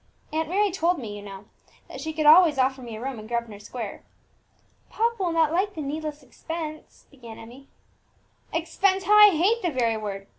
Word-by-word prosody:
Aunt 320 0 -1
Mary 405 +2 +1
told 350 0 +1
me, 220 -5 -7
you 205 - -8
know, 200 -1 -10 0.4
that 265 - -9
she 315 +2 -4
could 310 -1 -2
always 315 -1 +7
offer 265 0 +1
me 235 -3 -8
a - - -8
room 260 -1 -5
in 215 - -10
Grosvenor 235 -3 -4
Square." 220 0 -7 0.9
"Papa 460 -1 -1
will 355 -2 0
not 325 -2 +2
like 385 +4 0
the 315 - -5
needless 300 +1 -5
expense," 310 +2 -8
began 235 -5 -12
Emmie. 250 +5 -13 0.8
"Expense! 375 +4 0
how 405 +3 +2
I 420 0 +9
hate 410 +9 +2
the 355 - 0
very 235 -6 0
word! 200 -2 -6
300 Hz, 190 wpm, -25 LUFS, 235-345 Hz, 0.9 s, I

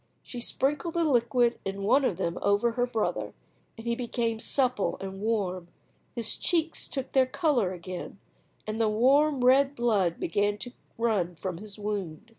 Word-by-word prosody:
She 245 - -7
sprinkled 295 +7 -1
the 340 - +2
liquid 240 -4 +2
in 195 +1 -4
one 270 +8 +4
of 185 - 0
them 170 +1 -2
over 205 +4 +2
her 245 +1 0
brother, 225 -3 -2 0.4
and 225 - -10
he 235 - +1
became 235 -2 -2
supple 255 -4 0
and 195 0 -6
warm; 195 -5 -1 0.5
his 235 -3 -1
cheeks 330 -2 0
took 270 -2 -4
their 260 -1 +4
colour 255 - +1
again, 185 +1 -7 0.5
and 215 +1 -2
the 220 - +3
warm 265 +4 +3
red 270 +2 +5
blood 210 -9 +1
began 205 +4 0
to 245 - -6 0.3
run 205 -7 0
from 180 0 -4
his 205 -1 -9
wound. 205 -6 -4
230 Hz, 165 wpm, -28 LUFS, 200-255 Hz, 0.5 s, red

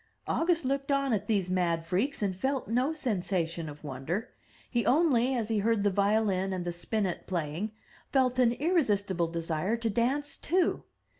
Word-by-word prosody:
August 335 -3 +1
looked 275 +1 -1
on 275 -2 +2
at 205 - -1
these 200 -5 +1
mad 175 -3 0
freaks 210 +9 -1
and 190 -2 0
felt 265 +7 -1
no 250 +6 +1
sensation 180 - -2
of 145 +1 -11
wonder. 150 - -4 0.4
He 240 -2 0
only, 265 -4 +3
as 230 -3 -2
he 220 -2 +1
heard 220 0 +2
the 205 - +3
violin 200 -1 +1
and 180 -1 -3
the 175 - -2
spinnet 190 +1 -2
playing, 175 +4 -2 0.4
felt 255 -2 +2
an 240 -2 +5
irresistible 205 - +1
desire 165 +5 -1
to 230 -1 -1
dance 275 +6 0
too. 355 +2 +1
215 Hz, 165 wpm, -29 LUFS, 180-260 Hz, 0.4 s, an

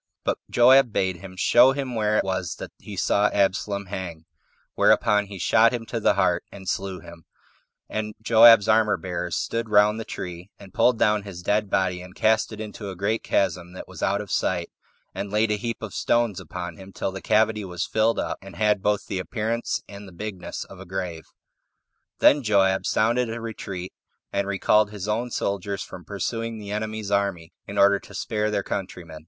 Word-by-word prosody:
But - - -1
Joab 125 0 +6
bade 95 -3 0
him 95 0 -11
show 120 +7 +5
him 135 -2 -4
where 105 -2 +1
it - - +2
was 95 -2 -2
that - - -8
he 105 - -9
saw 100 +2 +3
Absalom 100 0 0
hang; 90 -4 -6 0.5
whereupon 105 0 +3
he 100 -1 -8
shot 110 +6 +4
him 120 -2 -4
to - - -3
the - - +3
heart, - - +2
and 95 -1 -11
slew 95 0 -3
him, 85 -1 -13 0.6
and 110 0 -4
Joab's 115 -1 +7
armor 110 -1 +3
bearers 90 0 -4
stood 115 -1 -2
round 105 +1 +4
the - - -3
tree, 90 -2 -7
and 100 -2 -14
pulled 125 -2 +3
down 105 -1 +3
his 95 -3 -9
dead 105 +2 +1
body, 90 -2 0
and 90 +1 -12
cast 110 0 +2
it - - -8
into 105 -1 -6
a 95 - -6
great 105 +5 -1
chasm 90 -2 -1
that 95 - -9
was - - -11
out 100 +1 +1
of 105 - -9
sight, 85 -2 -1 0.4
and 100 - -4
laid 105 +1 +2
a - - +2
heap 115 +2 -4
of 110 - -6
stones 120 -6 +1
upon 90 -2 -7
him, 95 0 -12
till 95 - -3
the 95 - -7
cavity 110 0 +2
was 90 -3 -3
filled 110 +1 +1
up, - - -3
and 95 -2 -12
had 105 +1 +2
both 105 -2 0
the 95 - -3
appearance 115 +4 -2
and 100 0 -10
the - - -12
bigness 95 +1 -6
of - - -13
a - - -9
grave. 90 -3 -5 0.9
Then 145 - +5
Joab 95 -4 +2
sounded 120 +2 +2
a 115 +1 -4
retreat, 100 -5 -6 0.4
and 100 0 0
recalled 105 +2 +3
his 105 -2 -6
own 115 +3 -1
soldiers 100 -3 -2
from 90 - -11
pursuing 115 +4 -3
the 105 -1 -8
enemy's 110 -1 -3
army, 100 -5 -1
in 100 - -6
order 100 0 +5
to 100 - -14
spare 105 +1 -1
their 100 -2 -1
countrymen. 90 -5 -6
100 Hz, 195 wpm, -24 LUFS, 95-110 Hz, 0.9 s, Joab's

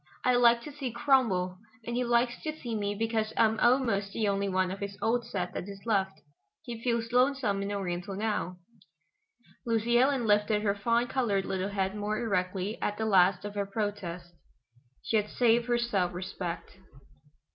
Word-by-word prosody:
I 250 - +4
like 235 -1 +5
to 300 - -7
see 275 -3 -5
Cromwell, 225 -8 +2 0.3
and 235 - -3
he 250 - +1
likes 240 0 +1
to 310 0 -5
see 240 -2 -5
me 205 -1 -1
because 220 0 -1
I'm 220 -1 +3
almost 230 -6 +2
the 220 -2 0
only 200 0 0
one 185 -1 +1
of 195 - -6
his 200 0 -5
old 235 +1 0
set 180 -6 -3
that 195 - -5
is 200 +1 -10
left. 195 -4 0 0.4
He 235 -2 -7
feels 235 -2 0
lonesome 250 -5 +2
in 200 +1 -3
Oriental 190 -1 -3
now." 205 -3 -2 1.1
Lucy 235 +1 +2
Ellen 265 -1 +2
lifted 210 0 +2
her 200 -2 +2
fawn 230 +4 +1
colored 225 -7 0
little 190 +1 -2
head 195 -1 -1
more 210 +1 -2
erectly 195 -2 -1
at 205 - -1
the 220 - -1
last 185 -2 +4
of 205 - -5
her 200 -1 -2
protest. 195 -5 -4 0.7
She 225 - +1
had 210 0 -1
saved 235 0 +2
her 240 0 +2
self 195 -7 0
respect. 180 -1 -5
210 Hz, 180 wpm, -29 LUFS, 195-235 Hz, 1.1 s, like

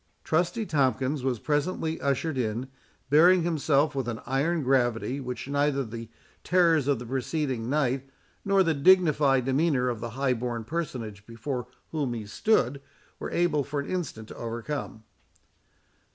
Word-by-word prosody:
Trusty 175 +7 0
Tomkins 135 - +1
was 130 -2 0
presently 160 - -1
ushered 140 +3 0
in, 120 0 -2 0.4
bearing 175 +4 +6
himself 150 -3 +2
with 135 -3 -2
an 115 -1 -3
iron 145 +5 0
gravity, 125 0 +1
which 125 -1 -5
neither 140 0 +1
the 115 0 -7 0.3
terrors 165 -6 +3
of 140 -2 +2
the 120 - -7
preceding 130 -1 -2
night, 135 -2 0 0.3
nor 195 -1 +4
the 165 -2 +2
dignified 145 -5 +4
demeanour 135 -2 +2
of 120 -3 -3
the 115 +1 -4
high 135 -2 +2
born 120 -1 -3
personage 115 -8 -4
before 125 +2 -4 0.2
whom 140 -6 -1
he 110 -2 -5
stood, 135 - +1 0.4
were - - -4
able 165 -4 +1
for 145 +2 -3
an 140 - -4
instant 140 -12 -4
to - - -9
overcome. 115 0 -5
135 Hz, 150 wpm, -27 LUFS, 120-155 Hz, 0.4 s, bearing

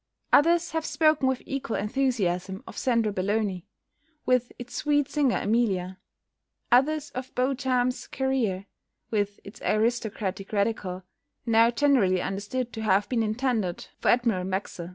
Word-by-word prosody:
Others 335 +3 +4
have 320 -1 -1
spoken 310 -4 +2
with 260 -1 -1
equal 275 -4 -3
enthusiasm 205 -5 -1
of - - -10
"Sandra 230 -5 +1
Belloni," 195 -1 -1 0.6
with 250 -1 +2
its 245 0 -9
sweet 290 -2 +1
singer 285 -5 +1
Emilia; 195 -5 0 0.7
others 295 +5 +3
of 255 +1 -7
"Beauchamp's 255 -1 0
Career," 245 -8 -1 0.5
with 205 -2 -1
its 200 - -12
aristocratic 215 -3 -1
Radical, 200 -3 -1 0.4
now 230 0 +5
generally 240 -8 +3
understood 210 +7 -3
to 220 - -5
have 205 -1 +2
been 240 -3 +1
intended 220 -4 -1
for - - +1
Admiral 235 -7 +2
Maxse. 185 -2 -4
230 Hz, 130 wpm, -26 LUFS, 200-260 Hz, 0.7 s, now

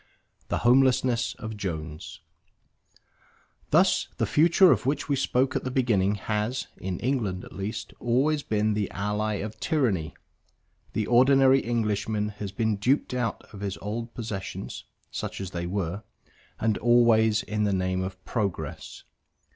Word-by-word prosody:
THE - - -1
HOMELESSNESS 125 -2 +3
OF 110 -2 -6
JONES 80 -6 -6 1.5
Thus - - +3
the - - +1
Future 170 +4 +5
of 120 -1 +1
which 140 - 0
we 145 - +1
spoke 130 0 +1
at - - -1
the 130 - -2
beginning 110 -6 +2
has 105 +4 -2
(in 95 -1 -4
England 110 -8 -1
at - - -13
least) 110 +3 -5
always 140 +6 +1
been 110 -3 0
the 105 -2 -1
ally 105 +2 -1
of 105 +2 -5
tyranny. 95 - 0 0.8
The 110 - 0
ordinary 135 +2 +5
Englishman 110 -3 -1
has 100 -2 -4
been 110 -1 0
duped 125 +6 +1
out 120 -4 -2
of 100 - -9
his 100 -1 -4
old 115 +3 -5
possessions, 105 -5 -6 0.3
such - - -5
as 95 -1 -5
they 85 -1 -3
were, 95 0 -2 0.6
and 110 -2 +1
always 115 -2 +4
in 105 0 -1
the 100 - +1
name 95 -1 0
of 95 0 -6
progress. 100 -6 -4
110 Hz, 145 wpm, -26 LUFS, 100-125 Hz, 1.5 s, Future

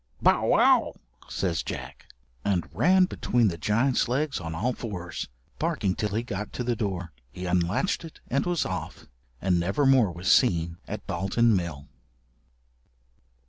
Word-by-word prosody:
"Bow, - - +3
wow," - - +4 0.3
says 90 -4 -1
Jack, - - -7 0.4
and 95 -4 0
ran 185 +2 +5
between 120 - +1
the 85 - -5
giant's 115 - +2
legs 140 +4 0
on 80 -2 -5
all 120 +9 0
fours, 90 -8 -5 0.3
barking 95 - 0
till 105 +1 -2
he 115 - 0
got 105 -3 -5
to 125 - -3
the 120 0 0
door. 95 -6 -3 0.2
He 90 0 -7
unlatched 90 - 0
it 165 - -11
and 140 +3 +1
was 175 -3 +1
off, 90 -5 -5 0.3
and 90 -2 +2
never 95 +11 +1
more 130 -8 +5
was 85 +2 0
seen 85 -8 +3
at 105 0 -6
Dalton 100 +4 +2
Mill. 80 -6 -3
100 Hz, 150 wpm, -27 LUFS, 90-120 Hz, 0.4 s, ran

